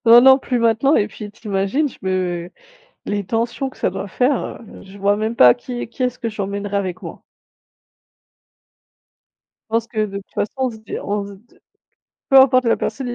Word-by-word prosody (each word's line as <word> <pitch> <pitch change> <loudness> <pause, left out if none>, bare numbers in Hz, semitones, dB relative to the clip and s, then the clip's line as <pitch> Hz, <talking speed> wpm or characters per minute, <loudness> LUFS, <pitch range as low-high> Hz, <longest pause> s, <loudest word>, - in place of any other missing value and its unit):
Non, 235 +1 +9
non, 265 +1 +7
plus 250 -2 -2
maintenant 230 +5 +3
et 210 - +1
puis, 205 0 -9
tu 215 0 -12
imagines 200 +10 0
je - - -16
me 180 -2 -2 0.6
les 205 -1 -2
tensions 235 +6 -2
que - - -20
ça - - 0
doit 195 +1 -5
faire, 255 +5 -1 0.2
je 195 +1 -13
vois 200 +1 +2
même 220 +2 -2
pas 255 - +7
qui 245 0 -7
est - - -5
qui 255 - -6
est-ce 250 0 -1
que 230 - -3
j'emmènerai 200 -1 -4
avec 185 -3 -3
moi. - - -9 2.5
Je - - -5
pense 230 - -1
que, 215 -2 -1
de 200 -1 -6
toute 200 - -10
façon, 205 - -2
on - - -2
se 220 - -10
di 220 - -6
on 205 0 -2
se - - -10
d 220 +5 -23 0.7
peu 270 -1 +7
importe 255 -1 +5
la 230 - +3
personne, 265 -3 -3
il 240 - -3
220 Hz, 205 wpm, -20 LUFS, 200-245 Hz, 2.5 s, Non